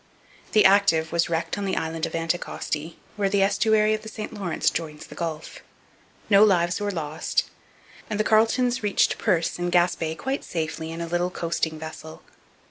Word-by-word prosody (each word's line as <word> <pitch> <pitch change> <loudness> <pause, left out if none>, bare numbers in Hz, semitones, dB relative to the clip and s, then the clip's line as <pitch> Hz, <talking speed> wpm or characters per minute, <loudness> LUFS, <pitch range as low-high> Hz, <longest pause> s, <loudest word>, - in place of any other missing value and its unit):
The 215 - +5
Active 190 -5 +4
was 170 0 +1
wrecked 165 +4 -2
on 200 - -2
the 190 - -1
island 160 +1 -2
of - - -7
Anticosti, 165 -1 -3 0.2
where 200 -1 +1
the 195 0 +3
estuary 215 +2 +3
of 215 - -2
the 220 - -8
St 220 -1 -7
Lawrence 190 -5 0
joins 155 -2 -5
the - - -12
Gulf. 160 -2 -5 0.7
No 200 0 +6
lives 180 -3 +3
were 205 - -1
lost, 160 -4 -1 0.7
and 210 -1 -2
the - - +3
Carletons 240 +3 +2
reached 205 -2 +1
Perce 170 0 0
in 175 0 -1
Gaspe 175 -2 +1
quite 265 +1 -3
safely 160 -1 -4
in 165 +1 -6
a 170 - -3
little 175 +1 0
coasting 170 -2 -2
vessel. 160 0 -9
175 Hz, 175 wpm, -25 LUFS, 165-205 Hz, 0.7 s, No